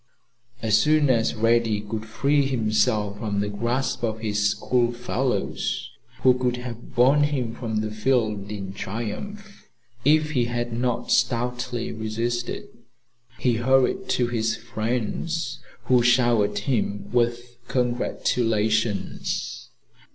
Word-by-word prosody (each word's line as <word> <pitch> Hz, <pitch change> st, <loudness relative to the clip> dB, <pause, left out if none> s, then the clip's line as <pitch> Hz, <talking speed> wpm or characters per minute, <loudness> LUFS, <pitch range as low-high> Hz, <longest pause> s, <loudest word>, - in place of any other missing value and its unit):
As 110 Hz, -1 st, +4 dB
soon 150 Hz, +1 st, +4 dB
as 115 Hz, -2 st, +1 dB
Reddy 115 Hz, -1 st, +2 dB
could 110 Hz, +1 st, -5 dB
free 140 Hz, +5 st, +2 dB
himself 110 Hz, -4 st, +1 dB
from 105 Hz, -3 st, -2 dB
the 105 Hz, 0 st, 0 dB
grasp 120 Hz, +5 st, -1 dB
of 110 Hz, -2 st, 0 dB
his 105 Hz, -2 st, +1 dB
school 120 Hz, +3 st, +1 dB
fellows, 120 Hz, -2 st, -2 dB, 0.3 s
who 130 Hz, -, +7 dB
would 125 Hz, -1 st, 0 dB
have 125 Hz, -1 st, -8 dB
borne 130 Hz, +4 st, +5 dB
him 135 Hz, -6 st, 0 dB
from 110 Hz, -3 st, -2 dB
the 110 Hz, 0 st, -3 dB
field 110 Hz, -3 st, 0 dB
in 95 Hz, -2 st, -5 dB
triumph 120 Hz, -, -6 dB, 0.3 s
if 155 Hz, +2 st, +4 dB
he 125 Hz, -5 st, +2 dB
had 120 Hz, 0 st, -2 dB
not 120 Hz, 0 st, -1 dB
stoutly 125 Hz, 0 st, 0 dB
resisted, 115 Hz, +2 st, -3 dB, 0.7 s
he 120 Hz, -3 st, +1 dB
hurried 130 Hz, +10 st, +2 dB
to 125 Hz, -, +2 dB
his 115 Hz, -2 st, 0 dB
friends, 115 Hz, +8 st, -3 dB, 0.2 s
who 125 Hz, 0 st, +4 dB
showered 120 Hz, -4 st, +3 dB
him 105 Hz, -2 st, -1 dB
with 120 Hz, 0 st, 0 dB
congratulations. 115 Hz, -4 st, -1 dB
120 Hz, 120 wpm, -24 LUFS, 110-125 Hz, 0.7 s, who